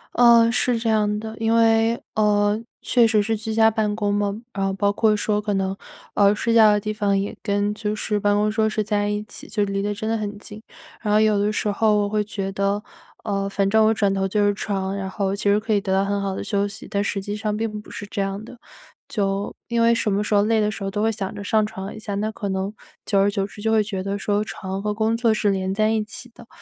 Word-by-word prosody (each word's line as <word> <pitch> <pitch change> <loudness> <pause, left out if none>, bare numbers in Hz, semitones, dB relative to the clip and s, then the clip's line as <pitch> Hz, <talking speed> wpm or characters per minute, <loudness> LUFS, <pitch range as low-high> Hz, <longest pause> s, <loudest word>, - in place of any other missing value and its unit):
呃， 235 -1 +6
是 245 0 +1
这 225 0 -1
样 210 -1 +1
的， 220 0 -7
因 225 0 +2
为， 225 0 +3
呃， 210 0 +2 0.2
确 240 -2 +4
实 215 -2 +3
是 225 +1 0
居 220 +1 -5
家 220 0 +4
办 210 -2 0
公 205 -2 0
嘛， 205 +1 -1
然 195 - -2
后 195 - +1
包 200 +1 +1
括 215 0 +3
说 210 0 0
可 205 -1 -1
能， 190 0 -1 0.4
呃， 200 0 +4
睡 230 +1 0
觉 220 -2 +7
的 210 - +2
地 215 +1 -3
方 200 -2 +1
也 200 +1 -2
跟 205 +1 0
就 210 0 -3
是 210 -1 -1
办 205 0 +2
公 210 +1 +2
桌 220 0 +1
是 215 0 -1
在 205 0 0
一 210 0 -2
起， 215 - -9
就 210 - 0
离 195 0 -1
得 205 +1 -1
真 215 +2 -4
的 225 - +1
很 210 -1 -4
近， 210 +1 -11 0.4
然 210 -2 -1
后 210 - +5
有 215 -2 +3
的 205 +1 +1
时 215 - -2
候 215 0 +2
我 205 - 0
会 210 0 0
觉 195 -2 -4
得， 200 +2 -1 0.4
呃， 200 -2 -1
反 195 0 0
正 220 +2 +4
我 - - +4
转 200 -3 +1
头 195 0 0
就 205 +1 +1
是 205 - +3
床， 195 -1 -3
然 190 -1 -4
后 195 0 -1
其 - - -7
实 205 +1 +4
可 220 0 -1
以 200 - +2
得 195 -2 -3
到 195 +1 +2
很 200 0 -1
好 195 -1 -2
的 - - -4
休 200 -1 0
息， 200 - -10
但 200 0 -1
实 200 0 -2
际 205 +1 -4
上 210 0 -2
并 215 -2 -3
不 - - -16
是 205 - -7
这 200 0 -4
样 195 +2 -3
的。 245 - -13 0.5
就 200 -2 -1
因 235 -1 0
为 230 0 +5
什 225 -2 0
么 205 +2 +1
时 210 - -2
候 205 0 +5
累 220 0 +2
的 210 0 +1
时 210 - -8
候 195 - -2
都 210 +2 -2
会 225 - +2
想 200 -1 -5
着 205 - -6
上 215 +1 +2
床 195 -1 -7
一 215 - -9
下， 205 -2 -4
那 215 +2 -1
可 200 -2 -5
能 190 +2 -2 0.3
久 200 -2 +2
而 200 +1 +4
久 200 -1 -1
之 205 +1 -11
就 220 0 0
会 220 -1 +4
觉 195 -3 -4
得 200 +1 -3
说 205 +1 0
床 190 -2 -5
和 210 +1 -1
工 220 +1 +1
作 230 -1 +2
是 210 -1 +1
连 190 0 -1
在 215 +2 +2
一 220 -1 +1
起 240 +3 -8
的， 235 - -15
210 Hz, 295 characters per minute, -22 LUFS, 200-220 Hz, 0.5 s, 觉